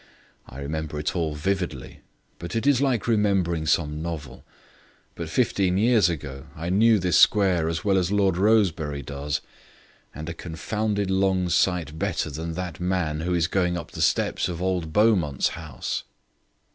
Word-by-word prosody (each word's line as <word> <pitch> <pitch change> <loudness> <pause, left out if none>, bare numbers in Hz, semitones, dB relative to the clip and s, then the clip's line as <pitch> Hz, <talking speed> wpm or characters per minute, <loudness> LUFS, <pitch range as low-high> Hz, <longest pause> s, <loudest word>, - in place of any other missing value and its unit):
I 65 - -11
remember 75 +1 -4
it 75 +4 -2
all 80 -4 -1
vividly, 90 -4 -3 0.4
but 85 +5 -6
it 115 - -1
is 140 -2 +4
like 130 -7 +1
remembering 95 -8 +1
some 75 -1 +1
novel. 80 -5 -6 0.7
But 85 -2 -6
fifteen 95 -3 +1
years 110 -3 +4
ago 70 -3 -6
I 85 +2 -4
knew 110 +3 +5
this 90 -2 +2
square 90 -6 +4
as 85 +5 -3
well 95 -2 +3
as 90 +1 -1
Lord 100 -3 +2
Rosebery 85 -8 +2
does, 70 +2 -3 0.7
and 80 +1 -8
a 85 - -3
confounded 100 +4 -2
long 95 -1 +1
sight 85 -4 +1
better 75 - -1
than 80 +3 -5
that 90 0 -5
man 90 -4 -1
who 90 +2 -1
is 85 -2 +2
going 90 0 0
up 85 - -7
the - - -6
steps - - +1
of 85 -2 -5
old 90 -3 -1
Beaumont's 95 - +2
house." 80 -6 -5
85 Hz, 160 wpm, -25 LUFS, 80-95 Hz, 0.7 s, knew